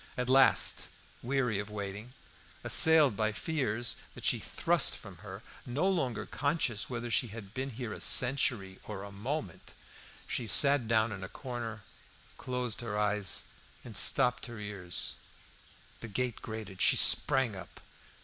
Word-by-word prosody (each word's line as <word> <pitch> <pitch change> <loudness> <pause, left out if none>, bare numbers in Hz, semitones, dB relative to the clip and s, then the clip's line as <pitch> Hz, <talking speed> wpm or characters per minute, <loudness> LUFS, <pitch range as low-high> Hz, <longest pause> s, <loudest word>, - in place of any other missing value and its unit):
At 125 0 -2
last, 135 +1 +4 0.3
weary 125 -4 -1
of 105 0 -6
waiting, 105 +3 -7 0.5
assailed 145 +1 +6
by 110 +1 -1
fears 120 -4 -3 0.2
that - - -9
she - - +2
thrust - - +2
from - - -12
her, - - -11 0.2
no 140 +10 -2
longer 165 -11 -1
conscious 140 -7 -2
whether 120 -1 -5
she 120 - +1
had 105 -2 -10
been 130 +1 -4
here 120 -3 -7
a - - -9
century 120 -7 +3
or 100 -2 -7
a 100 - -9
moment, 100 - -6 0.5
she 120 - -4
sat 140 +3 +5
down 110 0 +1
in 95 -2 -7
a 95 - -7
corner, 115 -4 -7 0.6
closed 125 -3 -3
her 110 -3 -5
eyes, 105 -2 +1 0.4
and - - -10
stopped 125 +2 +4
her 120 -1 -9
ears. 100 -4 -4 0.8
The 115 - -8
gate 120 +2 -3
grated; 110 -4 -8
she - - +5
sprang 130 -6 +3
up. 95 -3 -12
115 Hz, 150 wpm, -30 LUFS, 105-130 Hz, 0.8 s, assailed